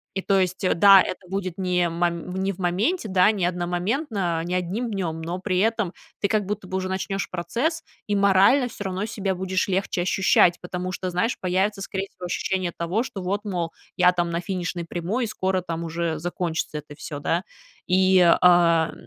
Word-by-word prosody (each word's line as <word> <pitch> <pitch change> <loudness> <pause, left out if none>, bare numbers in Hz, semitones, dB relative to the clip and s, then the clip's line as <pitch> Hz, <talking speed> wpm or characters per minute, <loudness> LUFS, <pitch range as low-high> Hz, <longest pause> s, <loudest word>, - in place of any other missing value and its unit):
И, 195 - -1
то 195 -1 +3
есть, 185 0 -1
да, 195 0 +9
это 185 0 -6
будет 185 -2 -3
не 180 -2 +1
мом 170 +1 -2
не 195 +1 0
в 185 - -10
моменте, 205 - 0
да, 185 -1 +4
не 195 -5 -1
одномоментно, 180 - -1
не 175 +2 -2
1 190 +7 -2
днём, 170 -5 -3
но 170 +3 -4
при 185 -1 -1
этом 215 -3 +1 0.3
ты 200 - +1
как 210 -1 0
будто 200 -1 -4
бы 190 0 -2
уже 185 0 -3
начнёшь 195 +1 -3
процесс, 235 - -2 0.2
и 205 - 0
морально 200 +7 +4
всё 210 - -8
равно 190 +1 -2
себя 200 -3 -2
будешь 185 +1 -1
легче 190 -1 -1
ощущать. 180 -1 +3
Потому 180 +1 -4
что, 185 0 -3
знаешь, 180 +7 0
появится 190 +3 0
скорее 195 0 -4
всего, 180 - -10
ощущение 185 0 -1
того, 175 +7 0
что 200 -6 -7
вот, 200 +4 -2
мол, 175 -5 -2 0.3
я 180 0 +6
там 175 -1 -1
на 170 +1 -1
финишной 180 -1 -3
прямой, 175 +9 -2
и - - -4
скоро 190 -2 -1
там 170 -1 -4
уже 165 -1 -2
закончится 165 -2 -3
это 145 0 -12
всё, 145 -1 -7
да. 170 +4 0 0.4
И, 185 0 +4 0.2
а, 170 -2 +5
185 Hz, 190 wpm, -24 LUFS, 175-195 Hz, 0.4 s, да